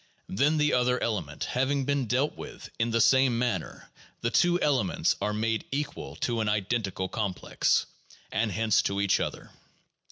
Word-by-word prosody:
Then, 145 +10 +2
the 150 0 +2
other 125 0 +2
ele 110 -5 0
ment 75 -1 -7
having 135 +2 0
been 140 -3 0
dealt 130 +6 +1
with - - -9
in 115 +1 +1
the 115 0 +1
same 125 +1 +4
manner, 115 -9 -3 0.3
the 115 - 0
two 175 +4 +3
elements 130 - +1
are 105 - 0
made 110 +1 -1
equal 145 +2 -4
to 120 -2 -1
an 110 - 0
identical 105 -2 -1
complex, 100 -3 0 0.5
and 110 -1 0
hence 110 +1 +2
to 100 0 -2
each 100 -1 +2
other. - - -4
115 Hz, 165 wpm, -28 LUFS, 105-130 Hz, 0.5 s, same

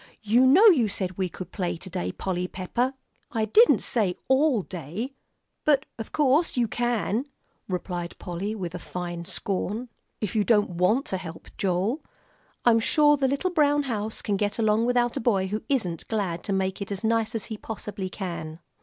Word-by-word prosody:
You 235 +5 +5
know 350 +12 +7
you 300 - +7
said 185 -2 -3
we 185 -1 -1
could 180 +1 -8
play 180 -4 -2
to 190 - -7
day, 90 - -3
Polly 180 - -2
Pepper!" 240 +9 -2 0.4
"I 220 -2 +1
didn't 445 - +5
say 200 -7 0
all 265 -5 +3
day; 185 - -5 0.5
but 295 -1 +3
of 225 - -6
course 295 +1 +2
you 240 -1 +3
can," 240 +1 0 0.4
replied 180 -2 -4
Polly, 190 +5 -4
with 180 -5 -5
a 180 - -5
fine 175 -1 -5
scorn, 205 +7 -2 0.3
"if 215 -2 -3
you 215 - +3
don't 210 -3 +3
want 185 +10 +2
to 190 - -1
help, 165 -3 -9
Joel. 195 - 0 0.6
I'm 230 -2 +6
sure 295 +6 +4
the 270 -2 +1
little 280 +7 0
brown 290 -3 +3
house 220 -4 -3
can 205 -2 0
get 205 0 -1
along 220 +1 +2
without 245 -1 +2
a - - -1
boy 200 -5 +2
who 210 +2 -2
isn't 185 - -1
glad 190 -6 -2
to - - -2
make 190 0 -1
it 200 - -5
as 200 +1 -3
nice 225 0 +1
as 220 - -1
he 220 - -5
possibly 205 -3 -5
can." 170 -5 -5
210 Hz, 185 wpm, -26 LUFS, 185-245 Hz, 0.6 s, know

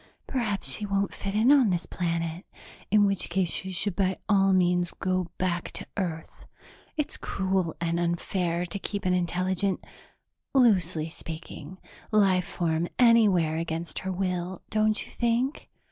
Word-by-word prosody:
Perhaps 215 - -2
she - - -4
won't 200 0 0
fit 200 0 -4
in 225 +5 +5
on 270 -7 +6
this 175 -2 0
planet, 170 0 -2 0.5
in 210 0 +5
which 195 -1 0
case 175 -1 +1
she 190 - -2
should 185 +1 -1
by 190 -1 +1
all 195 -2 +4
means 180 -1 +3
go 185 -2 0
back 175 -2 -1
to - - -6
Earth. 170 -5 -5 0.5
It's 300 - -1
cruel 190 -3 -1
and 170 0 0
unfair 170 0 -1
to 200 +3 -4
keep 200 0 -4
an 180 - +3
intelligent 180 +2 0 0.7
loosely 185 - +3
speaking 165 0 -8 0.3
life 195 -4 +3
form 165 -1 -1
anywhere 205 -10 +5
against 165 0 -3
her 190 - -3
will, 180 -1 -2
don't 215 0 +1
you - - -15
think?" 240 +4 -1
185 Hz, 145 wpm, -27 LUFS, 170-200 Hz, 0.7 s, on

